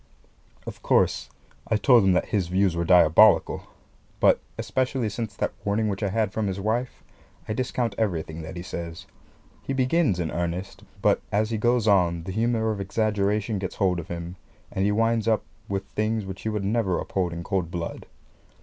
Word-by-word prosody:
Of -, -, -8 dB
course, -, -, +2 dB, 0.4 s
I 110 Hz, -, +1 dB
told 120 Hz, +1 st, +5 dB
him 95 Hz, -1 st, +4 dB
that 90 Hz, -, 0 dB
his 95 Hz, -5 st, 0 dB
views 95 Hz, 0 st, +2 dB
were 85 Hz, -, 0 dB
diabolical; 90 Hz, +4 st, +5 dB, 0.5 s
but, -, -, +5 dB, 0.2 s
especially 130 Hz, -3 st, -1 dB
since 110 Hz, -1 st, -5 dB
that -, -, -2 dB
warning 105 Hz, +1 st, 0 dB
which 100 Hz, 0 st, -3 dB
I 100 Hz, -, 0 dB
had 105 Hz, -1 st, 0 dB
from 110 Hz, -2 st, -1 dB
his 95 Hz, 0 st, -3 dB
wife, 115 Hz, +5 st, -2 dB, 0.4 s
I 110 Hz, -, -1 dB
discount 120 Hz, -1 st, -1 dB
everything 80 Hz, -6 st, -2 dB
that 80 Hz, +3 st, -8 dB
he 85 Hz, -, -6 dB
says. 85 Hz, 0 st, -6 dB, 0.6 s
He 135 Hz, -, -4 dB
begins 130 Hz, -, +2 dB
in 80 Hz, -2 st, -2 dB
earnest; 85 Hz, +2 st, -4 dB, 0.2 s
but -, -, +3 dB
as 105 Hz, +2 st, +1 dB
he 110 Hz, -, -1 dB
goes 120 Hz, 0 st, +2 dB
on 85 Hz, -5 st, +3 dB
the 95 Hz, -, -5 dB
humour 110 Hz, +1 st, +1 dB
of 105 Hz, -2 st, -3 dB
exaggeration 105 Hz, +1 st, 0 dB
gets 95 Hz, -1 st, -4 dB
hold 90 Hz, -3 st, +1 dB
of 80 Hz, -, -7 dB
him, 85 Hz, +1 st, -6 dB, 0.3 s
and 95 Hz, -, -1 dB
he 105 Hz, -, +2 dB
winds 115 Hz, +1 st, +1 dB
up 110 Hz, -1 st, +2 dB, 0.3 s
with 100 Hz, 0 st, -2 dB
things 110 Hz, 0 st, -1 dB
which 95 Hz, 0 st, -7 dB
he 110 Hz, -, -2 dB
would 105 Hz, -2 st, -2 dB
never 100 Hz, -4 st, +1 dB
uphold 90 Hz, -3 st, -2 dB
in 85 Hz, 0 st, -5 dB
cold 90 Hz, -3 st, -1 dB
blood. 85 Hz, -1 st, -5 dB
100 Hz, 185 wpm, -25 LUFS, 90-110 Hz, 0.6 s, told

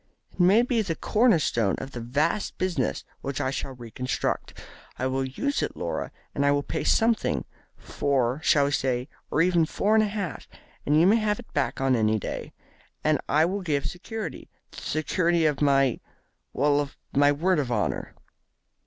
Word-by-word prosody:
It -, -, -23 dB
may 195 Hz, +6 st, +6 dB
be 245 Hz, -2 st, +1 dB
the 180 Hz, -6 st, -2 dB
corner 225 Hz, +1 st, +3 dB
stone 115 Hz, -9 st, +1 dB
of 135 Hz, -, -7 dB
the 120 Hz, -, -6 dB
vast 145 Hz, -, -1 dB
business 175 Hz, -, -1 dB, 0.2 s
which 140 Hz, 0 st, -4 dB
I 130 Hz, -2 st, 0 dB
shall 135 Hz, 0 st, -4 dB
re 120 Hz, -2 st, -10 dB
construct. 125 Hz, +3 st, -3 dB, 0.4 s
I 130 Hz, -, -2 dB
will 130 Hz, +1 st, 0 dB
use 280 Hz, -, -2 dB
it, -, -, -3 dB
Laura, -, -, -3 dB, 0.2 s
and 140 Hz, -, 0 dB
I 140 Hz, -, +4 dB
will 145 Hz, 0 st, +1 dB
pay -, -, -3 dB
something 225 Hz, 0 st, +2 dB, 0.3 s
four, 135 Hz, 0 st, -1 dB
shall 145 Hz, -3 st, +4 dB
we 140 Hz, -, -1 dB
say, 130 Hz, -1 st, -1 dB, 0.2 s
or 155 Hz, -, +3 dB
even 175 Hz, -2 st, +3 dB
four 205 Hz, +6 st, 0 dB
and 220 Hz, 0 st, +5 dB
a -, -, +1 dB
half 200 Hz, -4 st, -4 dB, 0.4 s
and 150 Hz, +2 st, +4 dB
you 165 Hz, -, +5 dB
may 210 Hz, +5 st, +5 dB
have 215 Hz, -1 st, 0 dB
it 245 Hz, -, -13 dB
back 145 Hz, -, -1 dB
on 135 Hz, -1 st, +2 dB
any 110 Hz, -1 st, +2 dB
day. -, -, -5 dB, 0.5 s
And 155 Hz, -2 st, +2 dB
I 155 Hz, +2 st, +4 dB
will 195 Hz, +4 st, -2 dB
give 150 Hz, -6 st, -1 dB
security 220 Hz, +5 st, -6 dB, 0.2 s
the -, -, -10 dB
security 165 Hz, +2 st, +1 dB
of 150 Hz, -2 st, +1 dB
my 135 Hz, -3 st, +3 dB, 0.5 s
well, 145 Hz, +1 st, +2 dB
of 145 Hz, -1 st, -4 dB, 0.2 s
my 145 Hz, +1 st, +5 dB
word 170 Hz, +4 st, +1 dB
of 130 Hz, -4 st, -2 dB
honour." 100 Hz, -, -2 dB
145 Hz, 190 wpm, -26 LUFS, 135-185 Hz, 0.5 s, may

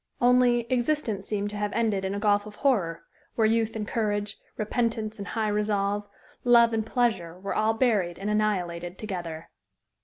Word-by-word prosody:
Only, 245 Hz, -1 st, +4 dB
existence 240 Hz, -6 st, 0 dB
seemed 205 Hz, -1 st, -2 dB
to 210 Hz, -, -5 dB
have 205 Hz, 0 st, -1 dB
ended 215 Hz, -4 st, +1 dB
in 190 Hz, +1 st, -2 dB
a -, -, -2 dB
gulf 205 Hz, 0 st, +2 dB
of 210 Hz, -, -10 dB
horror, 195 Hz, -12 st, +1 dB, 0.3 s
where 225 Hz, -, +3 dB
youth 225 Hz, 0 st, +1 dB
and 210 Hz, -2 st, -3 dB
courage, 205 Hz, -2 st, -2 dB, 0.2 s
repentance 220 Hz, 0 st, -1 dB
and 200 Hz, -, -5 dB
high 220 Hz, -2 st, -1 dB
resolve, 205 Hz, -1 st, 0 dB, 0.4 s
love 235 Hz, -1 st, +6 dB
and 220 Hz, -1 st, +1 dB
pleasure 215 Hz, -8 st, -1 dB
were 200 Hz, +1 st, -3 dB
all 220 Hz, +1 st, +2 dB
buried 210 Hz, -8 st, +1 dB
and 195 Hz, -, -5 dB
annihilated 180 Hz, -5 st, -1 dB
together. 175 Hz, -6 st, -6 dB
210 Hz, 165 wpm, -27 LUFS, 200-230 Hz, 0.4 s, love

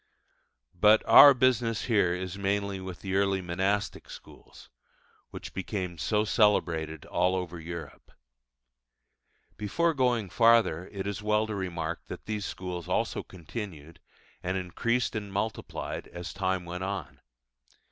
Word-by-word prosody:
But 105 Hz, +4 st, +5 dB
our 140 Hz, -2 st, +10 dB
business 120 Hz, -3 st, +2 dB
here 100 Hz, -7 st, +2 dB
is 90 Hz, 0 st, -5 dB
mainly 100 Hz, 0 st, -1 dB
with 95 Hz, -2 st, -8 dB
the 95 Hz, -1 st, -4 dB
early 100 Hz, -1 st, +2 dB
monastic 95 Hz, +3 st, -2 dB
schools, -, -, -13 dB, 0.6 s
which -, -, -9 dB
became 95 Hz, -3 st, -4 dB
so 105 Hz, +4 st, +1 dB
celebrated 80 Hz, -, +1 dB
all 90 Hz, +1 st, +1 dB
over 90 Hz, -2 st, -4 dB
Europe. 85 Hz, 0 st, -8 dB, 1.5 s
Before 165 Hz, -, +1 dB
going 120 Hz, -, +1 dB
farther 115 Hz, -7 st, +4 dB
it 100 Hz, -1 st, -5 dB
is 100 Hz, +1 st, -3 dB
well 105 Hz, +1 st, +2 dB
to 110 Hz, -, -5 dB
remark 85 Hz, -4 st, -4 dB
that -, -, -8 dB
these 105 Hz, -2 st, -3 dB
schools 90 Hz, -2 st, -6 dB
also -, -, 0 dB
continued, 85 Hz, -3 st, -8 dB, 0.4 s
and 95 Hz, +1 st, -2 dB
increased 115 Hz, +8 st, -1 dB
and 105 Hz, -2 st, -4 dB
multiplied 105 Hz, +2 st, -4 dB
as 85 Hz, 0 st, -7 dB
time 95 Hz, -1 st, -1 dB
went 90 Hz, +2 st, -5 dB
on. 100 Hz, +1 st, -5 dB
95 Hz, 130 wpm, -28 LUFS, 90-105 Hz, 1.5 s, our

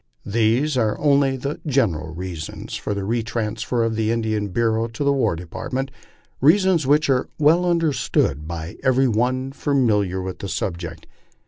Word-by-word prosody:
These 115 Hz, +7 st, +1 dB
are 110 Hz, -3 st, +1 dB
only 140 Hz, -2 st, +3 dB
the 140 Hz, +3 st, -4 dB
general 100 Hz, -, 0 dB
reasons 85 Hz, -3 st, -6 dB
for 105 Hz, -, -3 dB
the 100 Hz, -, -3 dB
retransfer 115 Hz, +1 st, -1 dB
of 115 Hz, -1 st, -1 dB
the 110 Hz, 0 st, 0 dB
Indian 110 Hz, -2 st, -1 dB
Bureau 115 Hz, +3 st, 0 dB
to 115 Hz, +4 st, -5 dB
the 140 Hz, 0 st, +3 dB
War 135 Hz, -10 st, +1 dB
Department 130 Hz, +11 st, -4 dB, 0.5 s
reasons 170 Hz, 0 st, +4 dB
whicb 150 Hz, +3 st, +4 dB
are 130 Hz, -1 st, +1 dB
well 165 Hz, +4 st, +4 dB
understood 150 Hz, -, +1 dB
by 85 Hz, 0 st, -6 dB
every 130 Hz, +1 st, +3 dB
one 125 Hz, +3 st, 0 dB
familiar 110 Hz, -10 st, +1 dB
with 95 Hz, 0 st, -5 dB
the 100 Hz, -, -5 dB
subject. 85 Hz, -4 st, -4 dB
115 Hz, 150 wpm, -22 LUFS, 100-135 Hz, 0.5 s, reasons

